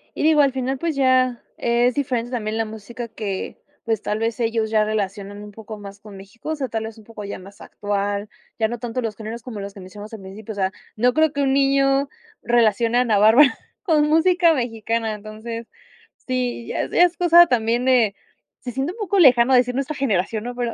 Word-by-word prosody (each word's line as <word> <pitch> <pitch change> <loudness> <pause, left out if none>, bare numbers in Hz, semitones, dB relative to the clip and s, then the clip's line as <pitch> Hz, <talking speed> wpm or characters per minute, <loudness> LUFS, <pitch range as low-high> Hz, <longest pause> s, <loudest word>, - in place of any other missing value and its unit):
y - - -4
digo, 310 -1 +5
al 280 -1 +3
final, 265 +1 -2
pues, 325 +2 -2
ya, 255 -2 +2
es 240 +1 +1
diferente 250 -4 -1
también 220 -3 -3
la 225 - 0
música 220 +2 -8
que, 210 -3 -5 0.2
pues, 225 -2 -1
tal 210 - -2
vez 225 +2 -2
ellos 225 -1 0
ya 215 -1 +2
relacionan 205 -1 -3
un 210 - -9
poco 215 0 -10
más 200 0 -10
con 210 -1 -13
México, 200 +9 -10
o 315 - 0
sea, 275 -3 -3
tal 225 -1 -3
vez 220 0 -8
un - - -15
poco 220 -1 -10
ya 200 - -6
más 195 +2 -14
actual, 205 0 -3 0.3
ya 220 - +2
no 240 +2 -5
tanto 240 +1 -4
los 225 -3 -3
géneros 225 +2 -7
como 235 -3 -8
los 200 0 -7
que 200 - -12
mencionas 205 +4 -10
al 220 - -8
principio. 195 +3 -9
O - - -7
sea, 190 -1 0 0.2
no 245 +3 +2
creo 315 -1 +3
que 285 - -1
un 270 -1 +2
niño 275 0 +2 0.3
relacione 235 0 +2
a - - +4
Ana 225 -4 +2
Bárbara 230 +7 +6 0.2
con 310 -6 +2
música 335 +2 +4
mexicana, 230 -3 -2
entonces, 220 +2 -7 0.6
sí 250 -2 -2
ya - - -2
ya 350 - +4
es 350 0 -2
cosa 345 0 +7
también 240 -1 +1
de 240 -6 +3 0.5
se 245 - -5
siente 270 +6 -2
un 450 - -15
poco 400 -1 -1
lejano 255 -4 +6
decir 250 0 +3
nuestra 275 +3 -3
generación, 220 -5 -1
¿no?, 245 +1 -5
pero 240 -2 -2
230 Hz, 215 wpm, -22 LUFS, 215-265 Hz, 0.6 s, cosa